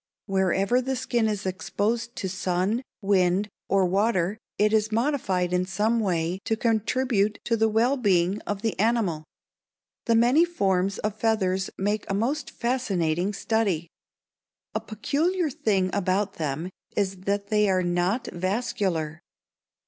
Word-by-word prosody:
Wherever 195 +4 +2
the 265 +1 -2
skin 240 -3 0
is 210 -2 -2
exposed 215 +5 -2
to 190 - -3
sun, 190 +4 0 0.2
wind, 195 0 +2 0.2
or 195 -1 +3
water 195 +1 +1 0.2
it 210 +1 +3
is 215 0 +2
modified 215 -8 0
in 180 0 +2
some 210 +5 +1
way 180 -3 0
to 225 - 0
contribute 225 -1 +1
to 230 - +1
the 225 0 +2
well 235 +6 +2
being 190 -4 +2
of 205 0 -3
the 225 -4 -1
animal. 205 -8 +1 0.8
The 230 - +4
many 245 +8 +5
forms 195 - 0
of 215 0 -3
feathers 190 -4 +1
make 205 +2 -1
a 195 - 0
most 260 +9 -1
fascinating 195 -8 0
study. 195 -6 0 0.8
A - - 0
peculiar 310 - -1
thing 195 -6 0
about 195 +1 0
them 155 +5 -2 0.3
is 195 -2 0
that 200 0 -1
they 210 -1 +3
are 185 -1 +2
not 175 +7 0
vascular. 185 -4 -1
205 Hz, 140 wpm, -26 LUFS, 185-225 Hz, 0.8 s, many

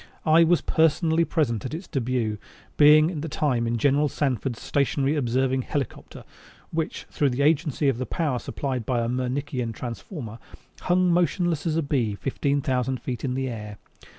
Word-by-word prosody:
I 160 +2 +6
was 170 +1 +3
personally 160 +1 +2
present 125 - 0
at 130 +4 -4
its 175 +4 -7
debut, 120 -5 -1 0.4
being 155 +2 +6
at 155 -5 -4
the 160 - -4
time 125 -6 0
in 115 0 0
General 145 +4 +2
Sanford's 130 -4 -2
stationary 140 +1 0
observing 130 -1 +1
helicopter 135 0 -5 0.5
which, 160 -1 -3
through 145 - +1
the 130 +2 -1
agency 150 -1 +2
of 130 -3 +1
the 130 - -3
power 150 -8 -1
supplied 130 0 -3
by 120 +1 0
a 115 - -1
Mernickian 125 -1 -2
transformer, 120 - -7 0.4
hung 180 0 +2
motionless 175 -2 +1
as 155 - 0
a 165 - +1
bee 125 -7 0
fifteen 140 +4 -1
thousand 130 -2 -1
feet 120 -1 -5
in 130 -2 -1
the 135 0 -1
air. 105 -4 -6
135 Hz, 170 wpm, -25 LUFS, 125-155 Hz, 0.5 s, I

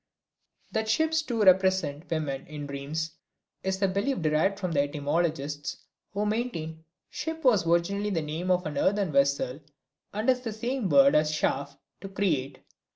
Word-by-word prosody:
That 220 0 -1
ships, 320 +6 +2
too, 235 -8 -1
represent 185 -5 +3
women 145 -4 -2
in 150 -1 -6
dreams 145 +3 -4 0.5
is 190 0 -2
a - - +5
belief 200 +9 0
derived 155 +6 +2
from 185 -3 -3
the 145 -3 +3
etymologists, 145 0 -2 0.3
who 205 +1 -1
maintain 170 -8 -3 0.3
"ship" 320 +1 -4
was 215 -10 +4
originally 195 +5 +1
the 165 -6 -1
name 160 +4 -4
of 180 0 +2
an 145 -2 -2
earthen 200 -3 +2
vessel 140 -1 +1 0.5
and 215 +2 -3
is 255 -1 +4
the 230 -3 -4
same 235 -1 -2
word 275 0 +6
as 150 0 +3
Schaff 140 -2 -1 0.2
(to 195 - -7
create). 150 -10 -1
180 Hz, 155 wpm, -28 LUFS, 150-210 Hz, 0.5 s, word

